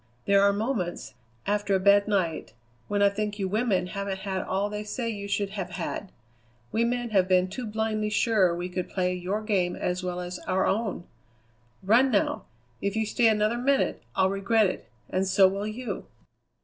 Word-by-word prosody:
There 200 0 +5
are 200 0 +5
moments, 205 -4 -2 0.3
after 205 -1 +1
a - - +2
bad 200 +1 +5
night, 180 - -1 0.3
when 205 0 +1
I 200 - +6
think 210 +1 -3
you 195 -2 -1
women 205 -2 +1
haven't 195 0 -4
had 190 -1 -2
all 195 +2 -1
they 210 0 -4
say 230 +3 -3
you 200 -2 -6
should 200 0 -1
have 195 -3 -4
had. 200 - -5 0.6
We 230 - +1
men 240 0 -1
have 190 -3 +3
been 185 -1 +3
too 225 +6 -6
blindly 215 0 -1
sure 205 -4 +3
we 175 +1 -3
could 180 0 -4
play 180 -1 0
your 185 +4 -3
game 190 -5 0
as 180 +1 -2
well 180 -1 -3
as 180 0 -5
our 190 +1 +2
own. 210 -3 -1 0.8
Run 235 +7 +5
now! 210 -5 0 0.4
If 200 +1 -1
you 220 0 +1
stay 230 +2 +2
another 215 +2 +2
minute 275 +2 +1
I'll 190 0 +3
regret 200 +3 +2
it, 185 - -3 0.2
and 190 +1 -1
so 190 0 +6
will 200 +2 -2
you." 235 +3 -5
200 Hz, 190 wpm, -27 LUFS, 185-215 Hz, 0.8 s, I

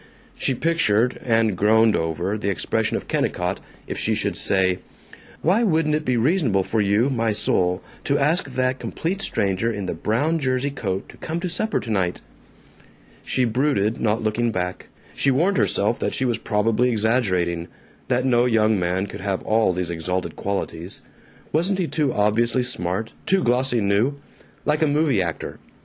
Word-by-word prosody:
She 135 - 0
pictured, 125 -7 +1
and 115 -3 +2
groaned 110 +3 +4
over, 80 +5 -1
the 105 -2 -2
expression 95 - 0
of - - -8
Kennicott 90 +2 -1 0.3
if - - -5
she - - +1
should - - -1
say, 95 -2 +3 0.6
"Why 185 +9 +3
wouldn't 160 -8 +2
it 155 0 -1
be 125 -1 +1
reasonable 120 - +2
for 110 +3 0
you, 105 +6 +2
my 115 -3 0
soul, 90 -3 +1 0.2
to 140 - +2
ask 150 +1 +1
that 130 0 0
complete 190 +4 -3
stranger 100 - 0
in 100 -3 -4
the - - -2
brown 125 - 0
jersey 130 0 0
coat 100 -8 -3
to - - -13
come 165 +1 -4
to 180 - -2
supper 215 +4 0
tonight?" 95 -6 -1 1.0
She 130 - 0
brooded, 115 -3 +1
not 110 0 +1
looking 115 +2 0
back. 90 -2 -4 0.3
She 140 - +1
warned 170 +9 +2
herself 110 +5 +1
that - - -1
she 130 - 0
was 120 -3 0
probably 115 +3 +1
exaggerating; 100 -7 0 0.4
that 125 +1 +1
no 120 -2 +3
young 110 -3 +3
man 90 +2 0
could 100 - -8
have 95 -1 -2
all 110 -2 +2
these 90 -1 -3
exalted 90 +2 -3
qualities. 95 -3 -4 0.5
Wasn't 180 +5 +1
he 185 - 0
too 150 -4 0
obviously 115 +4 +2
smart, 110 -2 -3
too 190 -1 +3
glossy 125 0 +2
new? 105 +8 +2 0.5
Like 150 +1 +1
a 155 - +4
movie 145 -7 +2
actor. 85 -3 -4
115 Hz, 165 wpm, -23 LUFS, 100-135 Hz, 1.0 s, groaned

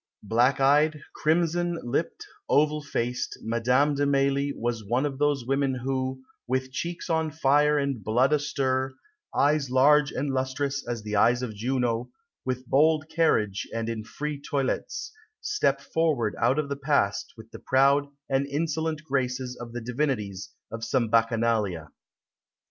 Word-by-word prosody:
Black 120 +6 +2
eyed, 145 +2 +3
crimson 170 +2 +1
lipped, 120 - -2 0.2
oval 150 +1 +3
faced, 125 -4 -3
Madame 125 +6 +2
de 145 0 +1
Mailly 140 0 +2
was 120 -3 -3
one 120 +7 0
of 140 -2 -4
those 145 -4 +1
women 135 0 +1
who 130 +1 -3 0.2
"with 130 +1 -1
cheeks 170 +6 -4
on 160 -2 +1
fire, 150 0 +3
and 140 -6 -1
blood 125 +8 +2
astir, 130 -3 0 0.4
eyes 145 -1 +2
large 145 +3 +4
and 140 +1 -2
lustrous 135 +2 -1
as 120 -3 -3
the 105 0 -3
eyes 120 +4 +3
of 115 -3 -4
Juno, 120 +1 -1 0.3
with 130 0 -3
bold 155 +4 +3
carriage 105 -12 +1
and 115 0 -3
in 110 -2 -4
free 145 +5 -5
toilettes, 140 -2 -2 0.3
step 420 - +1
forward 145 -7 0
out 125 +4 +3
of 150 -2 0
the 140 0 -3
past 140 -8 0
with 110 0 -13
the - - -9
proud 140 +2 +3 0.2
and 135 +1 0
insolent 155 +1 -2
graces 130 -3 -2
of 120 -1 -9
the 120 +1 -5
divinities 115 -6 -2 0.2
of 115 0 -6
some 120 -1 0
Bacchanalia." 115 -8 +1
135 Hz, 150 wpm, -26 LUFS, 120-145 Hz, 0.4 s, large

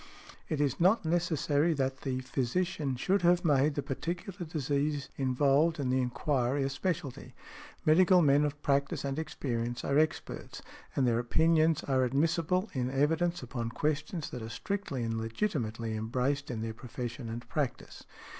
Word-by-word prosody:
It 155 - -1
is 140 -3 +1
not 185 +3 +4
necessary 160 -2 +1
that 135 -2 -1
the 130 -2 -2
physician 140 +3 -1
should 190 +10 +1
have 175 0 +3
made 145 -1 +3
the 145 - -1
particular 170 +6 -4
disease 145 -1 -1
involved 140 +5 +2
in 130 -3 0
the 130 0 +2
enquiry 135 +1 0
a 135 - 0
specialty; 140 -5 -3 0.5
medical 180 +3 +6
men 145 0 +5
of 145 0 -2
practice 140 0 +1
and 140 +2 -2
experience 120 -6 -3
are 140 +1 +3
experts, 155 0 -2 0.3
and 135 - +2
their 115 -1 +2
opinions 160 +5 +3
are 130 -2 +2
admissible 165 - +1
in 125 -2 -1
evidence 160 +5 +1
upon 120 -1 -4
questions 155 +5 -2
that 125 - -5
are 110 - -6
strictly 135 - -3
and 115 0 -2
legitimately 115 - -2
embraced 130 +6 -1
in 115 -3 -3
their 115 0 -3
profession 120 0 -6
and 120 +1 -6
practice. 145 -6 -3
140 Hz, 155 wpm, -31 LUFS, 125-160 Hz, 0.5 s, medical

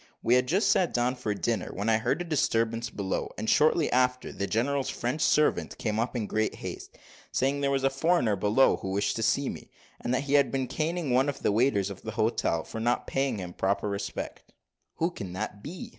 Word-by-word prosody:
We 120 - +3
had 125 0 +3
just 190 - +3
sat 180 -3 +2
down 125 +1 +1
to 110 -5 -2
dinner, 110 -1 -1
when 100 +3 -3
we 115 - +4
heard 125 +10 +1
a - - -10
disturbance 115 -7 0
below; 100 -3 -3
and, 110 - -4
shortly 155 +4 +4
after, 125 0 +1
the 100 - -3
general's 135 +6 0
French 125 +6 -2
servant 150 0 +2
came 110 -4 -1
up 120 +3 -1
in 115 -3 -1
great 110 +1 -1
haste, - - -8 0.3
saying 135 +2 +1
that 140 - 0
there - - +2
was 135 -1 0
a 135 - +4
foreigner 135 - +2
below, 105 +7 +3
who 95 - -5
wished 100 +2 0
to - - -2
see 120 +5 +2
me; - - -6 0.3
that 125 +2 0
he 140 0 -3
had 140 -2 +4
been 135 -1 0
caning 160 +1 -2
one 130 +3 +3
of 140 - -6
the - - +3
waiters 105 -3 +2
of 95 - -9
the 110 - -6
hotel, 110 -7 0
for 115 - -7
not 120 +2 0
paying 135 -4 -1
him 90 -2 -6
proper 100 +3 0
respect. 100 0 -5 0.4
"Who 165 +2 0
can 95 - -7
that 100 +2 -5
be?" 165 - -7
120 Hz, 220 wpm, -28 LUFS, 105-140 Hz, 0.4 s, we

